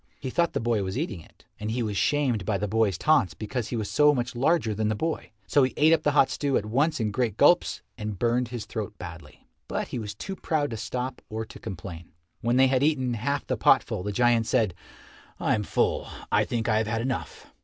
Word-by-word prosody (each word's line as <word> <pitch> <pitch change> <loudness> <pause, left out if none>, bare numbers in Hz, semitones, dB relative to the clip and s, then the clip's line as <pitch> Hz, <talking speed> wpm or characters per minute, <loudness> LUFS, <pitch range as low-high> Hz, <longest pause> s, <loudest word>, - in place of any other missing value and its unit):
He 130 -3 -4
thought 170 +3 +1
the - - 0
boy 115 -2 +1
was 95 +3 -3
eating 150 - -2
it. - - -21
And 105 +1 -3
he 120 +2 -1
was 105 -2 -2
shamed 125 0 +1
by 100 +2 0
the 105 - -2
boy's 105 -3 +1
taunts 150 - +3
because 115 +1 -3
he - - -4
was 110 -3 -2
so 150 0 +4
much 120 -1 -2
larger 135 -2 +2
than 110 +1 -1
the 110 - 0
boy, 160 +9 -3 0.2
so 145 - +3
he 130 -1 +1
ate 155 +2 +6
up 160 - +3
the 150 -2 +1
hot 135 - +4
stew 140 -2 0
at 105 - -2
once 145 +8 +1
in 110 -2 0
great 115 -1 -1
gulps 175 +5 +4 0.2
and 105 -2 -4
burned 120 +4 +1
his 120 -2 -6
throat 105 -1 -5
badly. 85 -2 -10 0.2
But - - -3
he 125 - -3
was 105 -2 -6
too 195 - -6
proud 150 -6 -1
to - - -3
stop 125 +3 -4
or 110 +1 -4
to - - -12
complain. 90 -5 -8 0.3
When 120 +1 +1
they 135 - +7
had 130 -1 +2
eaten 135 -5 +1
half 140 +6 -2
the - - -1
potful, - - +3
the 105 +3 -3
giant 120 0 +3
said, 110 -8 +2 0.7
"I - - +1
am 105 - +1
full. 105 - 0 0.2
I - - +3
think 115 -1 -2
I 110 -1 +3
have 110 - -1
had 115 +1 -1
enough." 130 0 -4
120 Hz, 240 wpm, -26 LUFS, 105-135 Hz, 0.7 s, they